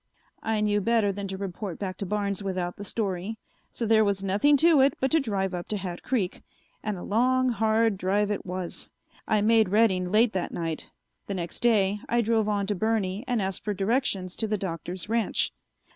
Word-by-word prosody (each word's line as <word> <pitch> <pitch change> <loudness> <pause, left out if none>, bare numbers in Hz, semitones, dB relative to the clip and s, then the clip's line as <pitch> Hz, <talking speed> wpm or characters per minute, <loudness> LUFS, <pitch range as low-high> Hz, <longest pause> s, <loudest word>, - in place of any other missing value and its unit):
I 220 -1 0
knew 205 -1 +2
better 225 -1 +2
than 200 0 -5
to 190 0 -5
report 195 -1 -5
back 185 -2 -4
to 200 - -4
Barnes 200 0 -1
without 185 -3 -3
the 205 - -6
story, 200 0 -3 0.3
so 235 - -4
there 220 0 +5
was 200 -2 0
nothing 210 +10 +4
to 320 -1 +5
it 275 +1 +4
but 265 - 0
to 320 - +4
drive 195 - -1
up 175 -1 -4
to 210 - -1
Hat 180 -3 -5
Creek, 215 -9 -1 0.4
and 210 -3 -3
a 175 - -7
long, 255 +4 +2
hard 220 -1 +2
drive 200 +2 +1
it 205 - -2
was. 180 -1 -5 0.4
I 215 -1 +2
made 220 -1 +4
Redding 190 -4 +2
late 220 +2 +4
that 185 -2 -2
night; 165 -2 -4 0.4
the 200 - -3
next 170 -2 -4
day 210 -4 +3
I 240 0 +3
drove 220 -1 +1
on 205 -1 0
to 205 - 0
Burney 205 0 -1
and 240 -5 +1
asked 190 0 -3
for 210 -1 -2
directions 195 -3 0
to 220 - -1
the 210 0 0
Doctor's 175 -1 -5
ranch. 225 0 +1
205 Hz, 205 wpm, -27 LUFS, 190-225 Hz, 0.4 s, there